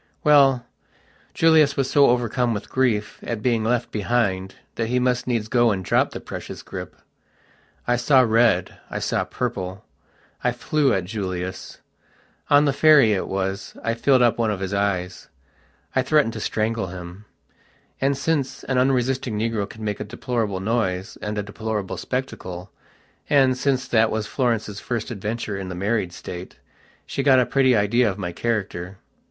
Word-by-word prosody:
Well, 135 -4 +5 0.7
Julius 160 -3 +4
was 135 -1 +1
so 140 +1 +5
overcome 120 -1 +1
with 100 - -7
grief 115 -5 0
at 115 -3 -4
being 115 -3 +1
left 120 +1 0
behind 100 -4 -1 0.2
that 115 - -2
he 125 +2 0
must 125 0 +1
needs 115 -4 0
go 120 0 +3
and 95 -3 -2
drop - - +2
the - - -7
precious - - -8
grip. - - -8 0.9
I 120 0 +2
saw 130 +2 +5
red, 115 -5 +2
I - - -4
saw - - 0
purple. 95 +1 -4 0.6
I 125 - +2
flew 140 +2 +1
at 95 -5 +1
Julius. 95 -2 -5 0.7
On 145 +1 +6
the 140 - +2
ferry, 145 -7 +6
it 95 - -2
was, 95 +1 -3
I 115 - 0
filled 125 +2 +3
up 120 -1 +2
one 115 -2 +2
of 105 -3 -2
his 95 +1 -3
eyes; 95 -2 -2 0.7
I 130 - +4
threatened 135 -3 +2
to - - -5
strangle 110 -1 -1
him. 90 +2 -9 0.8
And, 135 0 +2
since 140 -2 -1
an 130 -1 0
unresisting 130 -3 +1
negro 110 -2 -1
can 110 - -10
make 105 -1 -2
a - - -2
deplorable 110 -3 -3
noise 95 -4 -1
and 105 0 -4
a 105 - -1
deplorable 105 -1 -4
spectacle, 95 -8 -5 0.6
and, 135 -3 +4
since 130 0 0
that 110 -1 +4
was 110 -1 -2
Florence's 110 -5 -1
first 120 -3 -4
adventure 105 -1 -4
in 95 -1 -5
the 90 - -5
married 100 0 -1
state, 90 +1 -8 0.5
she - - -3
got 135 -2 +5
a 125 - +3
pretty 130 -1 +3
idea 110 +3 +3
of 95 - -5
my 90 -4 -4
character. 95 -3 -3
115 Hz, 165 wpm, -23 LUFS, 100-125 Hz, 0.9 s, On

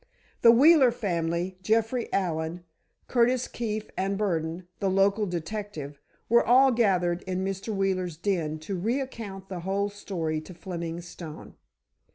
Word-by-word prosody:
The 230 - +8
Wheeler 275 +2 +7
family, 175 -4 -2
Jeffrey 225 +4 0
Allen, 170 -2 -1 0.4
Curtis 250 +1 +2
Keefe, 215 -2 -4
and 195 +1 -1
Burdon, 170 -3 -2
the 195 - +1
local 200 +2 +2
detective, 170 -4 -5 0.3
were 235 +1 +5
all 260 +3 +6
gathered 185 -7 +2
in 185 0 -1
Mr. 195 +2 -4
Wheeler's 185 -4 -1
den 165 -4 -1
to 180 +4 -4
recount 225 -4 -3
the 185 -2 -5
whole 195 +3 -1
story 170 -6 -3
to 180 +3 -12
Fleming 170 -2 -5
Stone. 170 -2 -10
190 Hz, 135 wpm, -27 LUFS, 170-215 Hz, 0.4 s, The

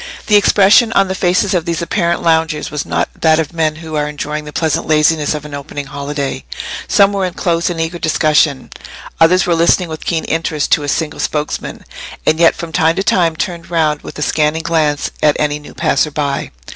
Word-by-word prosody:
The 210 - +3
expression 205 +3 +5
on 195 -1 +3
the - - -1
faces 185 +1 +1
of 175 -3 0
these 170 0 -2
apparent 170 -1 -1
loungers 160 -2 +1
was 150 -1 -4
not - - 0
that 160 -1 +4
of 160 0 -2
men 160 -2 0
who 160 0 -8
are 150 0 -1
enjoying 150 +1 -5
the 150 - -8
pleasant 160 0 -1
laziness 155 0 +2
of 150 0 -6
an 150 - -9
opening 145 0 -6
holiday. 140 -1 -4 0.4
Some 200 -1 +4
were 195 -1 -1
in 180 -1 -3
close 170 0 0
and 170 -2 -4
eager 165 +2 -3
discussion; 155 -3 +1 0.5
others 180 +3 +4
were 175 - +1
listening 170 +1 +2
with 155 -1 -7
keen 165 -2 -1
interest 160 -2 -2
to 150 - +4
a 145 - -5
single 155 +2 -2
spokesman, 150 -1 -3 0.4
and 155 +1 +2
yet 170 -1 +5
from 170 -1 -7
time 160 0 +2
to 195 - -1
time 170 -4 +2
turned 170 0 -4
round 155 -3 0
with - - -10
a 150 - -2
scanning 155 +2 0
glance 155 -3 0
at 150 -1 +3
any 150 0 0
new 150 - -14
passer 150 - +1
by. 145 -2 -2
160 Hz, 210 wpm, -15 LUFS, 150-170 Hz, 0.5 s, expression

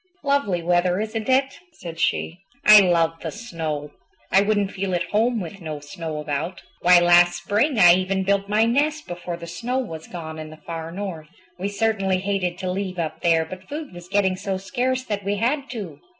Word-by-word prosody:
"Lovely 280 -12 +1
weather, 175 +1 +2
isn't 220 +2 -3
it?" 265 +2 +2
said 170 - -9
she. 170 +1 0 0.3
"I 210 0 +10
love 165 -3 +2
the - - -3
snow. 160 -9 -5 0.4
I 195 - +6
wouldn't 205 -1 +1
feel 190 -2 -2
at 175 0 -3
home 230 +3 +2
with 195 +1 -7
no 155 -3 -5
snow 155 +1 -6
about. 150 +4 -4 0.2
Why, 180 0 +7
last 175 0 +4
spring 225 - +1
I 175 -3 +8
even 190 +1 0
built 200 +1 0
my 215 +2 +3
nest 295 +6 +1
before 175 0 -5
the 170 - -8
snow 230 +10 -3
was 165 -12 -5
gone 160 -3 -7
in 155 0 -7
the 155 - -12
Far 165 0 -6
North. 175 -5 -6 0.3
We 195 - -1
certainly 200 -2 +1
hated 185 -2 -1
to 185 0 -3
leave 190 -1 -3
up 160 -2 -3
there, 165 -2 +3
but 185 +3 -10
food 295 - -6
was 175 0 -11
getting 195 -2 +2
so 195 0 -3
scarce 255 +6 -1
that 205 -4 -3
we 200 +1 0
had 270 +7 -1
to. 210 -9 -7
185 Hz, 195 wpm, -23 LUFS, 170-210 Hz, 0.4 s, I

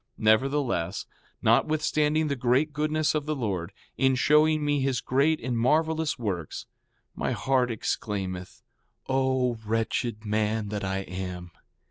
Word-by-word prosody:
4:17 - - -10
Nevertheless, 110 - +1 0.4
notwithstanding 155 0 +2
the 140 - -1
great 130 +4 +1
goodness 155 +1 +1
of 150 -1 -2
the 155 - 0
Lord, 100 -8 -3 0.3
in 135 -1 +4
showing 150 +3 +3
me 145 -1 +1
his 135 -2 0
great 140 +7 +2
and 125 0 -3
marvelous 155 +5 +1
works, 95 - -4 0.5
my - - -1
heart 130 -2 +1
exclaimeth: 95 -5 -4 0.4
O 130 -3 +1
wretched 115 0 -1
man 105 0 0
that 105 -1 -3
I 95 0 -1
am! 90 -1 -6
125 Hz, 130 wpm, -27 LUFS, 105-150 Hz, 0.5 s, in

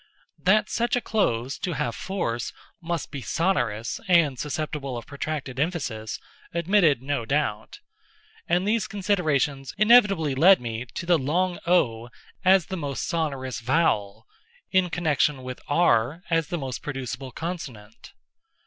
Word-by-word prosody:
That 210 +3 +3
such 235 +1 0
a - - +2
close, 130 - 0
to 180 -2 -2
have 135 -5 -2
force, 120 - -3 0.3
must 170 -2 -3
be 140 -2 -5
sonorous 120 - -1
and 160 -8 +4
susceptible 145 -3 -3
of 120 - -7
protracted 140 -2 -5
emphasis, 135 -10 -2 0.4
admitted 170 - +3
no 140 -3 -1
doubt: 115 -4 -2 0.7
and 180 +3 +2
these 215 0 +1
considerations 155 - 0
inevitably 210 - +5
led 180 +8 +6
me 120 0 -5
to - - -4
the 170 -2 +4
long 175 +7 0
o 120 -10 +2 0.3
as 190 -2 +5
the 190 0 -5
most 145 -4 -3
sonorous 135 -8 -2
vowel, 115 -6 0 0.5
in 185 -2 +3
connection 150 -5 +1
with 130 0 -7
r 145 0 +2
as 165 -2 +2
the 175 - -3
most 130 -5 -5
producible 135 -2 -5
consonant. 125 - -7
150 Hz, 135 wpm, -25 LUFS, 130-180 Hz, 0.7 s, led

